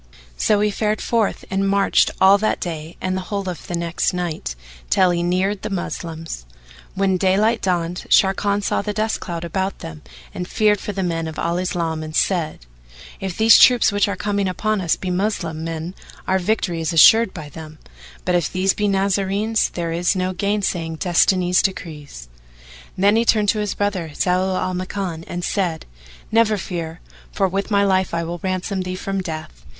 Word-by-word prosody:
So 210 - +2
he 210 0 +2
fared 215 +1 -1
forth 230 -3 0
and 195 0 +1
marched 200 0 +3
all 195 +1 +6
that 215 - 0
day 165 -1 -6
and 185 0 -2
the 190 - -2
whole 200 +1 -4
of 180 -4 -6
the 175 - -3
next 170 +1 -1
night, 165 - -3 0.3
till 185 -1 +4
he 170 0 0
neared 185 +3 0
the 215 - -4
Moslems. 165 - -5 0.5
When 190 -1 +2
daylight 205 +5 +2
dawned, 175 -1 -1
Sharrkan 200 +1 +3
saw - - 0
the 210 +1 -3
dust 220 +1 -1
cloud 170 -2 -5
about 190 +3 -2
them; 80 -1 -9 0.3
and 180 - -5
feared 210 0 +2
for - - -4
the 195 -1 -3
men 165 -2 -2
of 160 - -7
Al 170 +1 -1
Islam 165 -3 -2
and 155 0 -7
said, 160 - 0 0.5
"If 190 -2 -5
these 220 0 +7
troops 245 -3 +6
which 205 0 +2
are 200 - -2
coming 200 0 -1
upon 215 +2 -1
us 170 -3 +1
be 185 - -4
Moslem 180 -4 -2
men 165 +1 -4 0.3
our 190 0 +2
victory 180 -3 -1
is 160 +1 -1
assured 220 +7 +7
by 155 -5 -8
them; 155 +1 -10 0.5
but, 180 - +1
if 175 -3 +1
these 185 +1 +1
be 210 - -1
Nazarenes, 200 +2 +1
there 170 -1 -4
is 175 +4 +1
no 185 0 -1
gainsaying 185 -4 -1
Destiny's 180 +1 +3
decrees." 150 - -5 0.7
Then 200 +3 +4
he 230 - +3
turned 215 -3 +3
to 215 - +2
his 210 -2 -2
brother, 200 -5 -1
Zau 185 +1 +1
al 185 0 -2
Makan, 180 -2 -4
and 175 0 -5
said, 175 -5 -1 0.5
Never 220 -1 +3
fear, 170 -3 -5 0.3
for 195 - +1
with 195 +3 -2
my 200 -1 +3
life 190 -3 +1
I 170 - -1
will 170 +1 -5
ransom 185 +1 -2
thee 185 0 -4
from 195 +1 -3
death. 155 - -7
185 Hz, 185 wpm, -21 LUFS, 170-200 Hz, 0.7 s, these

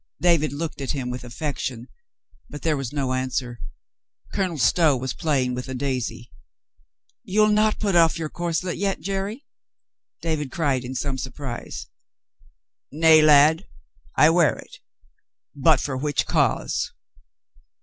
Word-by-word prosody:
David 170 -4 +3
looked 150 0 -5
at 135 - -2
him 130 -3 -3
with 125 0 -6
affection, 125 -1 -4 0.6
but 145 - -9
there 160 -2 +2
was 135 -4 -4
no 135 -3 -1
answer. 130 -2 -2 0.7
Colonel 185 -5 -1
Stow 155 0 +3
was 130 +1 -3
playing 135 -5 0
with 125 +1 -5
a 130 - -4
daisy. 125 -3 -3 0.9
"You'll 215 +3 +3
not 215 0 +2
put 200 -4 0
off 165 -1 +5
your 165 -1 -3
corselet 175 +2 -3
yet, 195 +1 -1
Jerry?" 200 +7 -4 0.7
David 155 -5 -2
cried 140 -6 0
in 125 +1 -6
some 135 +1 -2
surprise. 125 - -6 1.1
"Nay, 160 +1 +6
lad, 155 +1 +5 0.5
I 155 - +6
wear 170 -2 +3
it. - - -13 0.8
But 145 0 +4
for 135 0 -3
which 145 +2 -1
cause?" - - 0
150 Hz, 135 wpm, -23 LUFS, 130-165 Hz, 1.1 s, Nay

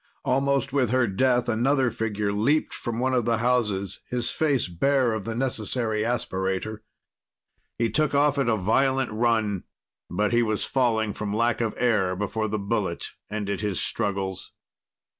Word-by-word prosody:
Almost 135 +1 +1
with 130 -5 +2
her 130 +1 +3
death, 125 +4 +1
another 130 +2 +2
figure 105 -3 -2
leaped 135 +10 +1
from 120 -2 -4
one 130 +2 0
of 120 -3 +1
the 115 -1 +2
houses, 105 -6 0
his 120 -1 0
face 145 -9 +1
bare 125 +7 +1
of 110 -3 -4
the 115 - -3
necessary 115 -3 0
aspirator. 105 -2 -2 1.0
He 115 -2 0
took 150 +4 +1
off 145 0 +3
at 135 -4 +1
a 115 - +3
violent 130 +6 +1
run, 110 -4 +1 0.5
but 105 +3 0
he 120 - +4
was 110 -2 0
falling 110 -5 +1
from 105 -1 -3
lack 115 0 +1
of 110 -2 -1
air 105 -7 +2
before 105 +3 -2
the 105 0 -2
bullet 100 -4 -2 0.2
ended 100 -2 -3
his 105 -4 -1
struggles. 95 -2 -2
115 Hz, 160 wpm, -25 LUFS, 105-125 Hz, 1.0 s, he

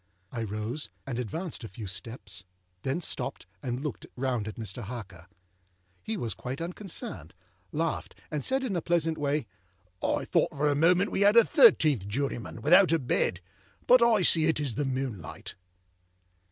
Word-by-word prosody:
I 120 - -4
rose, 110 +7 -3 0.2
and 125 -3 -3
advanced 160 - -4
a - - -5
few 105 +2 -8
steps; 95 +1 -5 0.4
then 135 - -1
stopped, 135 - -3 0.2
and 125 +1 -3
looked 150 - -5
round 125 -4 -1
at 110 - -6
Mr. 110 +1 -5
Harker. 95 -6 -8 0.7
He 110 +5 -3
was 115 -4 -2
quite 125 +9 -6
unconcerned, 165 - -5 0.4
laughed, 160 +1 -2 0.2
and 150 -3 -2
said 265 0 +2
in 225 -7 -2
a 170 - 0
pleasant 165 -2 0
way, 145 -2 0 0.6
âI - - 0
thought - - +2
for 145 +2 -1
a - - +3
moment 180 +6 +3
we - - 0
had 205 +3 +6
a 230 - +10
thirteenth 150 - +5
juryman, 120 -1 -3
without 180 +4 +6
a 165 - +4
bed. 120 - 0 0.4
But 250 0 +7
I 225 -5 +4
see 160 -2 +5
it 160 - +2
is 140 -5 -1
the 145 +6 -1
moonlight. 130 - -4
135 Hz, 165 wpm, -28 LUFS, 110-165 Hz, 0.7 s, a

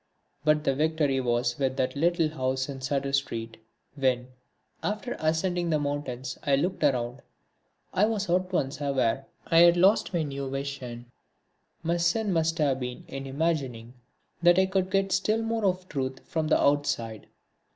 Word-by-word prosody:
But 150 0 +3
the 135 - +2
victory 150 -2 +1
was 120 0 0
with 135 -1 0
that 130 +1 0
little 165 +1 +2
house 130 -3 -1
in 135 -2 -7
Sudder 135 +1 -1
Street. 115 -5 -2 0.4
When, 130 -3 0 0.5
after 215 +4 -3
ascending 170 +2 0
the 155 - +3
mountains, 140 -3 -3
I 140 -2 +2
looked 175 +5 -1
around, 125 -2 +1 0.7
I 205 +3 +4
was 210 -2 -1
at 180 +1 +1
once 145 -5 -1
aware 135 -2 0 0.2
I 165 - +4
had 170 0 +7
lost 195 +5 +4
my 170 -3 0
new 140 -2 -4
vision. 130 -3 -5 0.7
My 170 +1 +1
sin 185 +4 +1
must 165 0 +1
have 140 -4 +1
been 125 -1 -5
in 135 0 -6
imagining 135 -6 -2 0.5
that 175 +1 +6
I 190 - +5
could 190 -1 0
get 195 0 +1
still 215 +4 +1
more 225 -1 -1
of 185 -1 0
truth 130 -4 -3
from 160 -1 -1
the - - +3
outside. 120 -6 0
145 Hz, 160 wpm, -27 LUFS, 130-175 Hz, 0.7 s, had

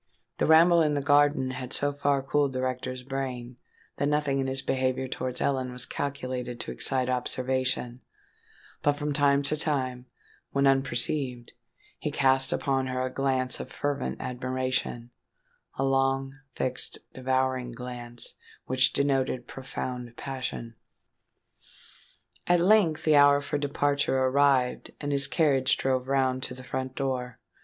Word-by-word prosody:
The - - +2
ramble 165 +2 +6
in 150 -2 +2
the 145 - 0
garden 145 -2 +3
had 130 0 -6
so 145 0 0
far 140 -1 0
cooled 140 0 +1
the 130 - -2
rector's 130 0 -3
brain, 130 -2 -5 0.4
that 140 - 0
nothing 145 -2 +1
in 135 - -1
his 135 +1 +1
behaviour 130 0 0
towards 125 0 -3
Ellen 130 -2 0
was 125 0 +1
calculated 130 -3 -4
to - - -4
excite 130 -2 0
observation; 130 0 -1 0.8
but, 145 - +3
from 145 0 -3
time 140 -1 +3
to 140 - 0
time, 130 -5 -2 0.5
when 140 0 +2
unperceived, 130 -1 +1 0.5
he - - -2
cast 135 -1 +3
upon 135 -2 0
her 130 0 -1
a 130 - -5
glance 130 -2 0
of - - -7
fervent 140 - -2
admiration—a 130 - -5
long, 135 0 +1 0.2
fixed, 125 0 -1 0.2
devouring 130 -1 -1
glance, 120 -1 -6 0.3
which 130 0 +3
denoted 135 -3 0
profound 125 -2 -6
passion. 130 -3 -5 1.7
At 175 0 +4
length 175 -4 +4
the 155 -1 +4
hour 145 0 +6
for 145 0 -3
departure 145 -1 0
arrived; 130 -1 +2
and 145 -1 -3
his 140 -1 +5
carriage 135 -3 +2
drove 130 -1 0
round 130 -1 +1
to 125 - -5
the 130 - -10
front 130 +1 -4
door. 125 -3 -3
130 Hz, 140 wpm, -27 LUFS, 130-140 Hz, 1.7 s, ramble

